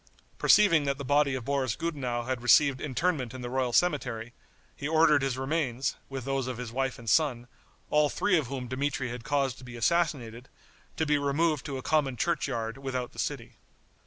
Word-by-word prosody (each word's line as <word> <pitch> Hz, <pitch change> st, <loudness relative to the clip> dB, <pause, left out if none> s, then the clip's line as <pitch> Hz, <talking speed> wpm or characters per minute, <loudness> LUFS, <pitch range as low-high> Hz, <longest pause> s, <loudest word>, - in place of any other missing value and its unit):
Perceiving 170 Hz, -8 st, +5 dB
that 140 Hz, -1 st, 0 dB
the 140 Hz, -, -6 dB
body 145 Hz, 0 st, +2 dB
of 125 Hz, -3 st, -5 dB
Boris 135 Hz, -4 st, 0 dB
Gudenow 130 Hz, -8 st, -3 dB
had 130 Hz, 0 st, -3 dB
received 130 Hz, +2 st, +4 dB
interment 140 Hz, -3 st, -1 dB
in 130 Hz, -, -7 dB
the 120 Hz, -, -5 dB
royal 130 Hz, -1 st, 0 dB
cemetery, 125 Hz, -7 st, 0 dB, 0.4 s
he 140 Hz, -, -4 dB
ordered 155 Hz, -2 st, +4 dB
his 135 Hz, -2 st, -1 dB
remains, 135 Hz, -2 st, -1 dB
with 135 Hz, -3 st, -6 dB
those 135 Hz, -2 st, -1 dB
of 130 Hz, -2 st, -4 dB
his 125 Hz, -2 st, -6 dB
wife 135 Hz, +1 st, -2 dB
and 120 Hz, -, -12 dB
son, 125 Hz, -3 st, +2 dB, 0.4 s
all 150 Hz, -1 st, +4 dB
three 205 Hz, +4 st, +1 dB
of 155 Hz, -7 st, +1 dB
whom 130 Hz, -1 st, -5 dB
Dmitri 130 Hz, 0 st, -2 dB
had 120 Hz, 0 st, -6 dB
caused 140 Hz, -2 st, 0 dB
to -, -, -12 dB
be 125 Hz, -1 st, -9 dB
assassinated, 130 Hz, -5 st, 0 dB, 0.5 s
to 160 Hz, -, +1 dB
be 150 Hz, -1 st, +2 dB
removed 145 Hz, +1 st, 0 dB
to 140 Hz, -2 st, -4 dB
a 130 Hz, -, -7 dB
common 140 Hz, -5 st, +1 dB
churchyard 115 Hz, -7 st, -1 dB
without 130 Hz, -2 st, -3 dB
the -, -, -12 dB
city. -, -, -4 dB
135 Hz, 190 wpm, -28 LUFS, 125-150 Hz, 0.5 s, Perceiving